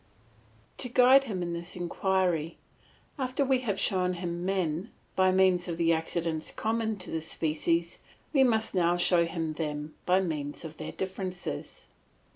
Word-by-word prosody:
To 250 Hz, -, 0 dB
guide 255 Hz, +3 st, +6 dB
him 190 Hz, -7 st, -3 dB
in 170 Hz, 0 st, -3 dB
this 170 Hz, +1 st, -5 dB
inquiry, 175 Hz, -2 st, 0 dB, 0.6 s
after 260 Hz, +2 st, 0 dB
we 265 Hz, -1 st, +3 dB
have 210 Hz, -6 st, -2 dB
shown 180 Hz, -1 st, +2 dB
him 175 Hz, -1 st, -4 dB
men 185 Hz, 0 st, -1 dB, 0.3 s
by 185 Hz, 0 st, +4 dB
means 185 Hz, -1 st, +3 dB
of 170 Hz, -2 st, -3 dB
the 165 Hz, -1 st, +3 dB
accidents 160 Hz, 0 st, -2 dB
common 220 Hz, -1 st, -1 dB
to 185 Hz, -, -5 dB
the 160 Hz, -, -2 dB
species, 165 Hz, +2 st, -1 dB, 0.3 s
we 270 Hz, -3 st, +6 dB
must 225 Hz, -3 st, +1 dB
now 175 Hz, -2 st, +2 dB
show 175 Hz, -1 st, +4 dB
him 165 Hz, -1 st, -3 dB
them 150 Hz, -1 st, -4 dB
by 180 Hz, +1 st, +5 dB
means 150 Hz, -5 st, -3 dB
of 160 Hz, -1 st, -8 dB
their -, -, -5 dB
differences. 185 Hz, -, -5 dB
180 Hz, 155 wpm, -29 LUFS, 165-195 Hz, 0.6 s, guide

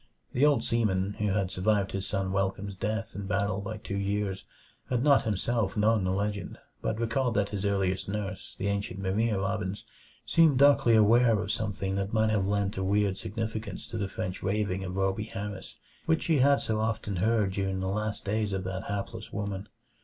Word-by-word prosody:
The 125 Hz, -, +2 dB
old 140 Hz, -6 st, +3 dB
seaman, 100 Hz, -5 st, +1 dB
who 105 Hz, -, +1 dB
had 95 Hz, -2 st, 0 dB
survived 100 Hz, 0 st, +1 dB
his 95 Hz, 0 st, -3 dB
son 95 Hz, -2 st, -1 dB
Welcome's 95 Hz, +1 st, -1 dB
death 110 Hz, +3 st, -3 dB
in 100 Hz, 0 st, -5 dB
battle 100 Hz, 0 st, 0 dB
by 110 Hz, +2 st, -5 dB
two 105 Hz, -2 st, -5 dB
years, 100 Hz, -1 st, -2 dB, 0.4 s
had 125 Hz, -1 st, +1 dB
not 140 Hz, -2 st, +5 dB
himself 110 Hz, 0 st, 0 dB
known 105 Hz, -1 st, +3 dB
the 95 Hz, -, +1 dB
legend, 100 Hz, +1 st, -2 dB, 0.2 s
but 110 Hz, -, -2 dB
recalled 120 Hz, +1 st, 0 dB
that 100 Hz, -1 st, +1 dB
his 100 Hz, -1 st, -3 dB
earliest 95 Hz, -2 st, 0 dB
nurse, 100 Hz, -1 st, -4 dB
the -, -, -3 dB
ancient 100 Hz, -1 st, -2 dB
Maria 105 Hz, +3 st, +1 dB
Robbins, 95 Hz, 0 st, -2 dB, 0.4 s
seemed 160 Hz, -5 st, +4 dB
darkly 140 Hz, -4 st, +6 dB
aware 115 Hz, +1 st, +5 dB
of 105 Hz, 0 st, -2 dB
something 100 Hz, -2 st, -2 dB
that 100 Hz, +1 st, -2 dB
might 110 Hz, 0 st, +3 dB
have 100 Hz, -3 st, +1 dB
lent 100 Hz, 0 st, 0 dB
a 95 Hz, -, -1 dB
weird 100 Hz, 0 st, +2 dB
significance 110 Hz, -1 st, -4 dB
to 115 Hz, -, -4 dB
the 100 Hz, -, -1 dB
French 90 Hz, -1 st, -4 dB
raving 95 Hz, -2 st, -1 dB
of 90 Hz, -1 st, -5 dB
Rhoby 95 Hz, +3 st, 0 dB
Harris, 100 Hz, -1 st, -6 dB, 0.3 s
which 160 Hz, 0 st, +2 dB
she 160 Hz, -4 st, +2 dB
had 140 Hz, +2 st, +5 dB
so 110 Hz, -1 st, -1 dB
often 110 Hz, -3 st, -1 dB
heard 105 Hz, +1 st, +2 dB
during 95 Hz, 0 st, -1 dB
the 95 Hz, -, -2 dB
last 105 Hz, +2 st, -2 dB
days 105 Hz, 0 st, 0 dB
of 95 Hz, -1 st, -2 dB
that 95 Hz, 0 st, -4 dB
hapless 100 Hz, +2 st, -5 dB
woman. 100 Hz, -1 st, -4 dB
100 Hz, 190 wpm, -29 LUFS, 95-110 Hz, 0.4 s, darkly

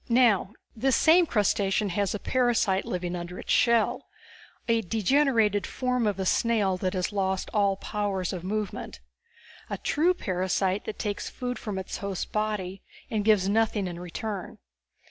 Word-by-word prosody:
"Now, 230 Hz, -5 st, +3 dB, 0.2 s
this 255 Hz, +2 st, +2 dB
same 335 Hz, +2 st, +5 dB
crustacean 205 Hz, -2 st, +1 dB
has 200 Hz, +2 st, 0 dB
a -, -, -4 dB
parasite 235 Hz, -7 st, +1 dB
living 180 Hz, -1 st, -3 dB
under 175 Hz, +1 st, -6 dB
its -, -, -5 dB
shell, 235 Hz, -2 st, +2 dB, 0.6 s
a 230 Hz, -1 st, +3 dB
degenerated 225 Hz, 0 st, +2 dB
form 250 Hz, -3 st, 0 dB
of 200 Hz, -2 st, -1 dB
a 190 Hz, -, -1 dB
snail 210 Hz, -2 st, +2 dB
that 185 Hz, +1 st, -2 dB
has 185 Hz, +2 st, -1 dB
lost 190 Hz, -2 st, -1 dB
all 200 Hz, -2 st, +3 dB
powers 195 Hz, -3 st, -2 dB
of 180 Hz, -2 st, -5 dB
movement. 205 Hz, -, -4 dB, 0.7 s
A -, -, -3 dB
true 345 Hz, +5 st, +2 dB
parasite 185 Hz, -, -1 dB
that 215 Hz, -, -5 dB
takes 205 Hz, -2 st, -3 dB
food 250 Hz, 0 st, -4 dB
from 210 Hz, -4 st, -4 dB
its 190 Hz, -, -4 dB
host's 200 Hz, -2 st, -3 dB
body 210 Hz, -3 st, -3 dB, 0.3 s
and 215 Hz, -2 st, 0 dB
gives 205 Hz, -3 st, +4 dB
nothing 215 Hz, -1 st, +1 dB
in 175 Hz, -1 st, -5 dB
return. 185 Hz, +3 st, -5 dB
205 Hz, 155 wpm, -27 LUFS, 190-225 Hz, 0.7 s, same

